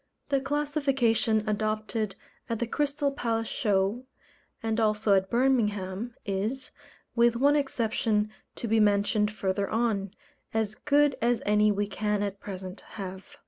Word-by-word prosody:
The 275 Hz, -1 st, +2 dB
classification 275 Hz, -7 st, +1 dB
adopted 215 Hz, -1 st, -1 dB, 0.3 s
at 230 Hz, -, 0 dB
the 235 Hz, -, -1 dB
Crystal 285 Hz, +3 st, 0 dB
Palace 230 Hz, -4 st, -1 dB
Show, 205 Hz, +3 st, 0 dB, 0.6 s
and 225 Hz, 0 st, 0 dB
also 215 Hz, -1 st, +2 dB
at 190 Hz, 0 st, +2 dB
Birmingham, 230 Hz, -4 st, +1 dB
is 215 Hz, +7 st, -2 dB, 0.4 s
with 235 Hz, 0 st, +4 dB
one 285 Hz, +4 st, +4 dB
exception, 225 Hz, -6 st, 0 dB, 0.2 s
to 235 Hz, -, -4 dB
be 225 Hz, 0 st, +3 dB
mentioned 210 Hz, 0 st, +3 dB
further 200 Hz, -1 st, -1 dB
on 220 Hz, -4 st, 0 dB, 0.5 s
as 220 Hz, -2 st, 0 dB
good 290 Hz, +3 st, +3 dB
as 240 Hz, 0 st, +1 dB
any 210 Hz, 0 st, +4 dB
we 205 Hz, 0 st, 0 dB
can 210 Hz, 0 st, -1 dB
at 200 Hz, -1 st, -3 dB
present 190 Hz, -1 st, -7 dB
have. 195 Hz, +8 st, -7 dB
220 Hz, 135 wpm, -28 LUFS, 205-245 Hz, 0.6 s, with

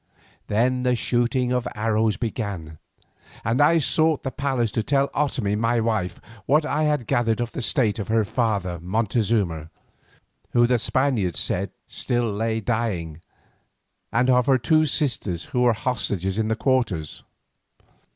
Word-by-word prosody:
Then 125 Hz, +4 st, +1 dB
the 125 Hz, 0 st, +2 dB
shooting 120 Hz, +1 st, 0 dB
of 125 Hz, -1 st, 0 dB
arrows 110 Hz, -1 st, +1 dB
began, 100 Hz, -9 st, -4 dB, 0.7 s
and 115 Hz, +5 st, +1 dB
I 165 Hz, +3 st, +5 dB
sought 160 Hz, 0 st, +2 dB
the 130 Hz, -, -3 dB
palace 130 Hz, -5 st, -1 dB
to 115 Hz, -, 0 dB
tell 140 Hz, +4 st, +1 dB
Otomie 130 Hz, -8 st, -1 dB
my 115 Hz, +2 st, +1 dB
wife 110 Hz, -5 st, -1 dB, 0.3 s
what 150 Hz, +3 st, +3 dB
I 155 Hz, 0 st, 0 dB
had 150 Hz, -5 st, 0 dB
gathered 115 Hz, 0 st, +1 dB
of 120 Hz, -1 st, -2 dB
the 130 Hz, -, -5 dB
state 115 Hz, -4 st, +1 dB
of 100 Hz, -, -4 dB
her 110 Hz, -1 st, +2 dB
father 100 Hz, -7 st, -1 dB
Montezuma, 100 Hz, -4 st, 0 dB, 0.8 s
who 120 Hz, 0 st, +5 dB
the 125 Hz, 0 st, +2 dB
Spaniards 120 Hz, -, 0 dB
said -, -, -1 dB, 0.2 s
still 120 Hz, -2 st, -1 dB
lay 110 Hz, +2 st, -1 dB
dying, 100 Hz, -9 st, -2 dB, 0.9 s
and 125 Hz, +2 st, +2 dB
of 125 Hz, -1 st, +3 dB
her 135 Hz, -1 st, +5 dB
two 155 Hz, +6 st, +3 dB
sisters 110 Hz, -, -1 dB
who 125 Hz, -, +2 dB
were 120 Hz, -1 st, +4 dB
hostages 105 Hz, -4 st, -2 dB
in 110 Hz, -, 0 dB
their 110 Hz, -, 0 dB
quarters. 120 Hz, -, -1 dB
115 Hz, 150 wpm, -23 LUFS, 105-130 Hz, 0.9 s, I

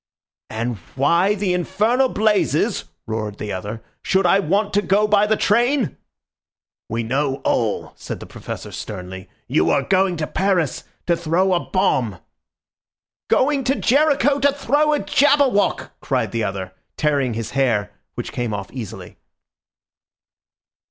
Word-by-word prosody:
"And 115 Hz, +1 st, -3 dB, 0.2 s
why 170 Hz, +9 st, +3 dB
the 195 Hz, -3 st, 0 dB
infernal 215 Hz, +9 st, +1 dB
blazes," 215 Hz, -2 st, +1 dB, 0.2 s
roared 110 Hz, -2 st, -4 dB
the 105 Hz, -, -5 dB
other, 105 Hz, +4 st, -6 dB, 0.2 s
"should 190 Hz, 0 st, +1 dB
I 195 Hz, +3 st, +5 dB
want 200 Hz, +3 st, 0 dB
to 205 Hz, -, +3 dB
go 205 Hz, +3 st, +2 dB
by 210 Hz, 0 st, +4 dB
the 220 Hz, 0 st, +2 dB
train?" 240 Hz, -, +2 dB, 0.9 s
"We 115 Hz, +1 st, -2 dB
know 135 Hz, +4 st, 0 dB
all," -, -, 0 dB
said -, -, -7 dB
the -, -, -9 dB
Professor -, -, -8 dB
sternly. 95 Hz, -2 st, -7 dB, 0.2 s
"You 80 Hz, -, +2 dB
are 140 Hz, -, +2 dB
going 190 Hz, 0 st, +2 dB
to 155 Hz, -, -1 dB
Paris 185 Hz, -5 st, 0 dB, 0.2 s
to 170 Hz, -, +2 dB
throw 170 Hz, +3 st, +1 dB
a 175 Hz, -, +3 dB
bomb!" 130 Hz, -, 0 dB, 1.1 s
"Going 275 Hz, 0 st, +2 dB
to 270 Hz, -, +2 dB
Jericho 285 Hz, 0 st, +3 dB
to 285 Hz, +1 st, +4 dB
throw 290 Hz, +2 st, +1 dB
a -, -, +2 dB
Jabberwock!" 280 Hz, -6 st, +2 dB
cried -, -, -1 dB
the 115 Hz, -2 st, -1 dB
other, 95 Hz, -2 st, -4 dB, 0.2 s
tearing 140 Hz, -6 st, +1 dB
his 115 Hz, -1 st, -4 dB
hair, 115 Hz, -7 st, +1 dB, 0.2 s
which 120 Hz, -, -5 dB
came 120 Hz, -4 st, -2 dB
off 100 Hz, -1 st, -6 dB
easily. 120 Hz, -7 st, -8 dB
180 Hz, 140 wpm, -21 LUFS, -, 1.1 s, I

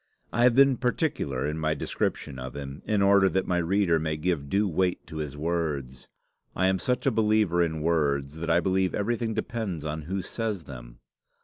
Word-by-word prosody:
I 120 Hz, +2 st, +4 dB
have 125 Hz, -2 st, +5 dB
been 135 Hz, -1 st, +5 dB
particular 125 Hz, -, -1 dB
in 75 Hz, +2 st, -2 dB
my 80 Hz, 0 st, 0 dB
description 65 Hz, -2 st, -3 dB
of 65 Hz, +1 st, -7 dB
him, 70 Hz, 0 st, -7 dB
in 105 Hz, -2 st, +1 dB
order 100 Hz, -1 st, +5 dB
that 95 Hz, 0 st, 0 dB
my 90 Hz, -1 st, +1 dB
reader 85 Hz, -1 st, +2 dB
may 80 Hz, 0 st, -2 dB
give 75 Hz, -4 st, -1 dB
due 100 Hz, +5 st, +2 dB
weight 90 Hz, +1 st, 0 dB
to 80 Hz, +1 st, -8 dB
his 75 Hz, -2 st, -4 dB
words. 75 Hz, -5 st, -3 dB, 0.5 s
I 95 Hz, -, +1 dB
am 95 Hz, 0 st, +2 dB
such 125 Hz, +7 st, -1 dB
a 135 Hz, -, +4 dB
believer 105 Hz, -5 st, +2 dB
in 80 Hz, -2 st, 0 dB
words, 75 Hz, -3 st, 0 dB
that 85 Hz, +1 st, -4 dB
I 85 Hz, +1 st, +4 dB
believe 95 Hz, 0 st, +1 dB
everything 115 Hz, +1 st, -1 dB
depends 110 Hz, -8 st, -3 dB
on 80 Hz, +1 st, -3 dB
who 95 Hz, 0 st, -2 dB
says 105 Hz, -2 st, -3 dB
them. -, -, -11 dB
85 Hz, 195 wpm, -27 LUFS, 75-105 Hz, 0.5 s, have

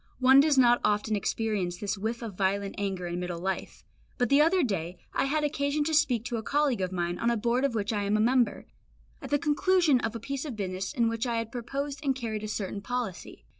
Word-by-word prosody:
One 260 Hz, +1 st, +6 dB
does 290 Hz, -1 st, +4 dB
not 245 Hz, -2 st, +5 dB
often 210 Hz, +1 st, +1 dB
experience 200 Hz, -4 st, -1 dB
this 205 Hz, +2 st, -2 dB
whiff 225 Hz, +4 st, -3 dB
of 215 Hz, -5 st, -6 dB
violent 195 Hz, +1 st, 0 dB
anger 190 Hz, -3 st, -2 dB
in 175 Hz, 0 st, -3 dB
middle 180 Hz, -1 st, -4 dB
life; 190 Hz, +2 st, -4 dB, 0.3 s
but 245 Hz, -3 st, +1 dB
the 280 Hz, +1 st, +5 dB
other 335 Hz, +3 st, +4 dB
day 180 Hz, -, -2 dB, 0.2 s
I -, -, +1 dB
had 300 Hz, +2 st, 0 dB
occasion 290 Hz, 0 st, 0 dB
to 320 Hz, +2 st, -2 dB
speak 270 Hz, -7 st, +2 dB
to 240 Hz, -2 st, -2 dB
a -, -, -3 dB
colleague 280 Hz, -3 st, +1 dB
of 185 Hz, 0 st, -1 dB
mine 175 Hz, -1 st, -2 dB
on 235 Hz, -, +1 dB
a 235 Hz, -, +1 dB
Board 240 Hz, +4 st, 0 dB
of 275 Hz, -4 st, 0 dB
which 210 Hz, 0 st, -1 dB
I 205 Hz, -, 0 dB
am 205 Hz, +1 st, +2 dB
a -, -, 0 dB
member, 240 Hz, 0 st, +2 dB, 0.6 s
at -, -, -7 dB
the 290 Hz, -, +3 dB
conclusion 310 Hz, 0 st, +3 dB
of 225 Hz, -1 st, -3 dB
a -, -, -4 dB
piece 275 Hz, +4 st, -4 dB
of 285 Hz, -7 st, -5 dB
business 190 Hz, -2 st, -3 dB
in 235 Hz, -5 st, +1 dB
which 230 Hz, +2 st, -1 dB
I 235 Hz, -1 st, -1 dB
had 230 Hz, 0 st, -3 dB
proposed 275 Hz, +4 st, -4 dB
and 270 Hz, -2 st, +1 dB
carried 220 Hz, -4 st, -4 dB
a -, -, -3 dB
certain 200 Hz, -1 st, -4 dB
policy. 240 Hz, -4 st, -5 dB
230 Hz, 240 wpm, -28 LUFS, 200-275 Hz, 0.6 s, One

